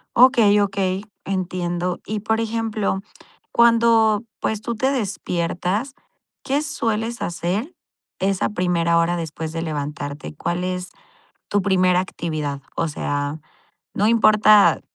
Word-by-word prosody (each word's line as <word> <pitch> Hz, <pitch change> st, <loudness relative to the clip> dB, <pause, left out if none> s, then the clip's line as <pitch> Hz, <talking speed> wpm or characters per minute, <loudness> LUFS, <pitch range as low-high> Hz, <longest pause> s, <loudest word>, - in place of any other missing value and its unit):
Okey, 235 Hz, -5 st, +6 dB
okey, 195 Hz, 0 st, -1 dB, 0.2 s
entiendo. 180 Hz, -2 st, -2 dB
Y, 215 Hz, 0 st, -3 dB
por 220 Hz, +1 st, 0 dB
ejemplo, 220 Hz, -3 st, -1 dB, 0.5 s
cuando, 230 Hz, -2 st, +4 dB, 0.2 s
pues, 220 Hz, -1 st, -2 dB
tú 235 Hz, +1 st, -3 dB
te 260 Hz, +5 st, +1 dB
despiertas, 200 Hz, 0 st, -2 dB, 0.5 s
¿qué 280 Hz, +2 st, 0 dB
sueles 230 Hz, -5 st, -2 dB
hacer 185 Hz, -, -2 dB, 0.4 s
esa 195 Hz, 0 st, 0 dB
primera 175 Hz, -3 st, +1 dB
hora 170 Hz, +1 st, +2 dB
después 160 Hz, -1 st, -5 dB
de 165 Hz, 0 st, -4 dB
levantarte? 145 Hz, -2 st, -5 dB
¿Cuál 175 Hz, +4 st, -2 dB
es 180 Hz, 0 st, -3 dB, 0.6 s
tu 205 Hz, -, +2 dB
primera 185 Hz, -2 st, +3 dB
actividad? 155 Hz, -6 st, -3 dB
O 165 Hz, -, 0 dB
sea, 145 Hz, 0 st, -3 dB, 0.6 s
no 205 Hz, +2 st, +2 dB
importa, 215 Hz, -2 st, +5 dB
195 Hz, 115 wpm, -22 LUFS, 170-220 Hz, 0.6 s, Okey